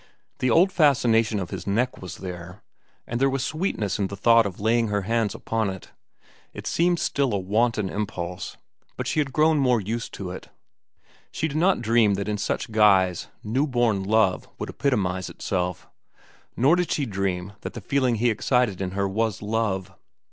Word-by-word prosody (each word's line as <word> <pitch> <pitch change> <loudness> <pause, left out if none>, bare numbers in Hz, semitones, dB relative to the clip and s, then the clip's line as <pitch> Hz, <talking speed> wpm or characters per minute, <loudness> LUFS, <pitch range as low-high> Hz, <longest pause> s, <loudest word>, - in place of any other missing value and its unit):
The 130 - +1
old 180 +9 +5
fascination 115 - +3
of 90 - -5
his 95 -1 -6
neck 120 +6 0
was 90 - -7
there, 90 +1 -8 0.4
and 120 +2 -3
there 135 - +4
was 135 -1 -1
sweetness 150 - -2
in 100 - +1
the 100 - -7
thought 115 +1 +5
of 95 - -8
laying 115 +2 +2
her 105 -1 -1
hands 115 0 0
upon 110 -2 -1
it. 95 -1 -8 0.6
It - - -8
seemed 175 +1 +2
still 140 -5 0
a - - +2
wanton 105 +2 +1
impulse, 90 -3 -4 0.4
but - - -3
she - - 0
had 140 -3 0
grown 155 +2 +3
more 125 -4 +3
used 115 +4 -4
to 95 -3 -5
it. 90 - -9 0.8
She 160 - -1
did 150 0 -4
not 180 -5 +2
dream 110 -3 +3
that 100 +1 -3
in 105 -1 -2
such 105 - -2
guise 95 -5 +3 0.2
new 130 +8 0
born 120 -6 +1
love 100 -1 +2
would - - -5
epitomize 95 -9 -1
itself. 90 -2 -3 0.7
Nor 135 +8 +5
did 180 -1 -1
she 145 - 0
dream 95 -3 -2
that - - -6
the - - -6
feeling 130 -4 +1
he 115 +2 +2
excited 110 -3 +1
in 95 -1 -3
her 100 0 +1
was 110 +1 -1
love. 105 -3 -1
110 Hz, 185 wpm, -25 LUFS, 95-125 Hz, 0.8 s, old